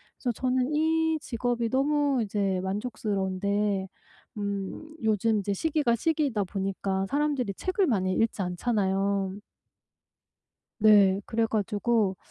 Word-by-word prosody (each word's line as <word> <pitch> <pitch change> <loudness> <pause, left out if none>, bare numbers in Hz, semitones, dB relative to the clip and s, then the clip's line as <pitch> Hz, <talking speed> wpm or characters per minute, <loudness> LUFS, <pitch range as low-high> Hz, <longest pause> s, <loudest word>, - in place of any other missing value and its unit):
그래서 245 - -2
저는 255 +3 0
이 320 +1 +2
직업이 240 -3 -2
너무 280 0 +2
이제 200 -2 -1
만족스러운데 200 -1 -1 0.5
음 200 +10 -4
요즘 220 0 +2
이제 200 0 -1
시기가 295 - +1
시기이다 280 -5 0
보니까 195 0 -2
사람들이 280 -5 0
책을 370 0 0
많이 185 -6 +1
읽지 225 0 0
않잖아요. 195 0 0 1.5
네. 200 -3 +6
그래 225 0 +1
가지고 215 -1 0
215 Hz, 265 characters per minute, -27 LUFS, 195-260 Hz, 1.5 s, 네